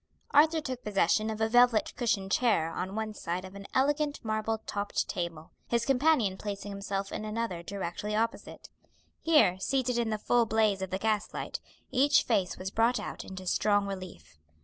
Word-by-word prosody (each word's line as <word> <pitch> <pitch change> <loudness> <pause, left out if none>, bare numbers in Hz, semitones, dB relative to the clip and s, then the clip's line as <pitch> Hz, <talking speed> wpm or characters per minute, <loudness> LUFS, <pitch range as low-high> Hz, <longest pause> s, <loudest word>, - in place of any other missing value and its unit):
Arthur 315 +2 +5
took 255 -4 -5
possession 210 +1 +2
of 220 0 -4
a 220 - +2
velvet 245 -1 +4
cushioned 200 -5 -1
chair 205 -11 +2
on 185 +4 -4
one 220 -1 -3
side 180 -1 -4
of 190 - -11
an 200 0 -9
elegant 290 +2 +1
marble 220 0 -1
topped 205 0 -2
table, 170 -3 -5 0.2
his 235 -1 0
companion 260 -7 +2
placing 205 0 -5
himself 200 0 -4
in - - -4
another 215 -5 -3
directly 200 +3 -4
opposite. 230 +1 -3 0.5
Here, 300 - +4
seated 250 +2 0
in 230 -2 0
the 215 - -1
full 235 +2 +2
blaze 215 -3 +2
of 190 - -3
the 190 - -1
gas 215 0 0
light, - - -4 0.3
each 275 +2 +4
face 200 -6 0
was 190 +1 -5
brought 230 +3 +2
out - - -6
into 185 0 -9
strong 205 +2 +2
relief. 180 - -8
215 Hz, 175 wpm, -29 LUFS, 190-235 Hz, 0.5 s, Arthur